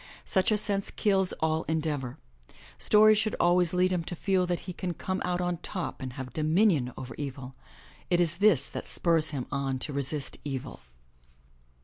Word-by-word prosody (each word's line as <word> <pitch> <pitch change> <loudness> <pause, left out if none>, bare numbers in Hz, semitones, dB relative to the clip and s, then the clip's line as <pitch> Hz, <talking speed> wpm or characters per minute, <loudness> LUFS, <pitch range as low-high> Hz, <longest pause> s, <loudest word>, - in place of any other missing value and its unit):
Such 190 +2 +2
a 215 - +3
sense 200 -2 0
kills 195 -3 +2
all 160 0 +1
en 160 0 +1
deavor. 145 -4 -3 0.6
Stories 215 0 +5
should 215 0 0
always 175 -1 +4
lead 185 +1 +2
him 180 -2 0
to 175 - -4
feel 185 0 +1
that 175 -1 -1
he 180 - -7
can 175 0 -4
come 185 +3 -3
out 180 0 -1
on 175 -1 -1
top 180 -2 -5
and 130 -2 -5
have 130 -1 -7
dominion 155 - +2
over 125 -2 -7
evil. 135 -2 -6 0.6
It 175 - +3
is 170 -1 +1
this 190 -9 +4
that - - -6
spurs 165 -2 +1
him 135 -4 -3
on 135 -2 -1
to 145 +3 -4
resist 140 +1 -3
evil. 135 -2 -5
170 Hz, 185 wpm, -28 LUFS, 140-185 Hz, 0.6 s, Stories